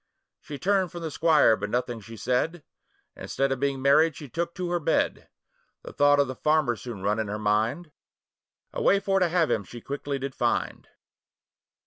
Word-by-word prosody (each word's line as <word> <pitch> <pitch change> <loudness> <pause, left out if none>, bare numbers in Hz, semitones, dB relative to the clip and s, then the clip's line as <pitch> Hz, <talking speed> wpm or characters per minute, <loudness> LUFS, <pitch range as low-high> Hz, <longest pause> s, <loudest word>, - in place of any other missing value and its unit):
She 145 - -8
turned 190 +1 +1
from 175 -2 -7
the 160 - -4
squire, 155 -7 +4
but 105 - -5
nothing 120 0 -2
she 115 +3 -11
said, 145 +8 -1 0.5
Instead 135 0 -2
of 135 - -1
being 140 -1 -1
married 155 +3 +4
she 145 - -9
took 170 +5 -4
to 180 -1 -3
her 175 - +1
bed; 155 - 0 0.5
The - - -9
thought 145 0 +4
of 140 - +3
the 130 - -4
farmer 150 -3 +1
soon 110 -4 -8
run 105 +2 0
in 110 - -2
her 105 +1 -3
mind, 110 +10 0 0.8
A - - -3
way 200 - +4
for 195 -1 +1
to 180 -2 +2
have 165 -2 +1
him - - 0
she 120 +5 -10
quickly 140 +2 -4
did 135 0 -5
find. - - -1
140 Hz, 190 wpm, -26 LUFS, 120-165 Hz, 0.8 s, squire